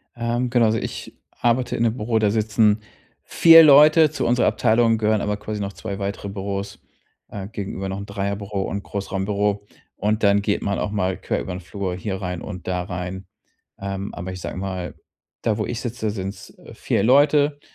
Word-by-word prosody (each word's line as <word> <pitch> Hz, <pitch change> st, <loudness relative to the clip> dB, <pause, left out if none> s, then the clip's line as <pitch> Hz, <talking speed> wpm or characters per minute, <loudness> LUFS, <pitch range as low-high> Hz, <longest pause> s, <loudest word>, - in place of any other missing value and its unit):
Ähm, 120 Hz, +1 st, -1 dB
genau, 120 Hz, -2 st, +3 dB
also 110 Hz, -, +1 dB
ich -, -, -6 dB, 0.2 s
arbeite 120 Hz, +1 st, 0 dB
in 115 Hz, -, 0 dB
'nem 115 Hz, 0 st, +1 dB
Büro, 110 Hz, 0 st, 0 dB
da 105 Hz, -2 st, +2 dB
sitzen 110 Hz, -1 st, +2 dB, 0.4 s
4 165 Hz, -1 st, +8 dB
Leute. 155 Hz, +1 st, +7 dB
Zu 155 Hz, -, -2 dB
unserer 120 Hz, +1 st, +2 dB
Abteilung 115 Hz, 0 st, +3 dB
gehören 110 Hz, -1 st, +1 dB
aber 105 Hz, 0 st, -1 dB
quasi 105 Hz, 0 st, -5 dB
noch 100 Hz, 0 st, -4 dB
2 100 Hz, -2 st, -6 dB
weitere 100 Hz, 0 st, -4 dB
Büros, 100 Hz, 0 st, -5 dB, 0.5 s
äh, 100 Hz, -2 st, -6 dB
gegenüber 100 Hz, -3 st, -5 dB
noch 95 Hz, -, -4 dB
'n 100 Hz, -, -6 dB
Dreierbüro 100 Hz, 0 st, -3 dB
und 100 Hz, +1 st, -4 dB
Großraumbüro. 100 Hz, +1 st, -2 dB, 0.3 s
Und 105 Hz, +2 st, -1 dB
dann 100 Hz, 0 st, +4 dB
geht 100 Hz, 0 st, -1 dB
man 100 Hz, -1 st, -1 dB
auch 105 Hz, -, -2 dB
mal 95 Hz, -3 st, -1 dB
quer -, -, -2 dB
über -, -, -6 dB
'n 90 Hz, -, -5 dB
Flur 95 Hz, 0 st, -5 dB
hier 95 Hz, +1 st, -4 dB
rein 90 Hz, -1 st, -4 dB
und 90 Hz, -3 st, -8 dB
da 90 Hz, -1 st, -1 dB
rein. 90 Hz, +1 st, -6 dB, 0.5 s
Ähm, 100 Hz, 0 st, -5 dB
aber 95 Hz, +1 st, -6 dB
ich 90 Hz, -, -8 dB
sage -, -, -5 dB
mal, 95 Hz, -2 st, -5 dB, 0.5 s
da 110 Hz, -2 st, 0 dB
wo 105 Hz, -, -1 dB
ich 120 Hz, -, -4 dB
sitze, 115 Hz, -3 st, -3 dB
sind's 95 Hz, -1 st, -7 dB, 0.2 s
4 -, -, -1 dB
Leute. 145 Hz, +3 st, +4 dB
105 Hz, 190 wpm, -22 LUFS, 95-115 Hz, 0.5 s, 4